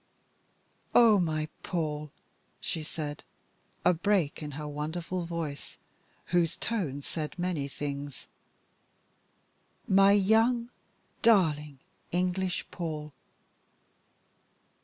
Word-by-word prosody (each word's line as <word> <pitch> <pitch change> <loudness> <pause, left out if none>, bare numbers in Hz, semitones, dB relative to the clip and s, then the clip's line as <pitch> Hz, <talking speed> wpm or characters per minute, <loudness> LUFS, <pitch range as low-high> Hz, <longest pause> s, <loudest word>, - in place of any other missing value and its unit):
"Oh, 225 -4 +7
my 155 -3 0
Paul," 150 -4 -2 0.5
she 160 - -2
said, 150 -1 -5 0.6
a 180 - +6
break 175 -3 +1
in 150 - -4
her 150 +1 -5
wonderful 165 +4 -3
voice, 165 -4 -5 0.6
whose 170 -2 +3
tones 155 - -2
said 155 0 -4
many 175 -6 -1
things, 140 0 -5 1.6
"my 195 +1 +6
young, 225 +4 +3 0.5
darling, 155 - +3 0.3
English 180 +1 0
Paul!" 155 -3 -4
165 Hz, 85 wpm, -30 LUFS, 150-190 Hz, 1.6 s, Oh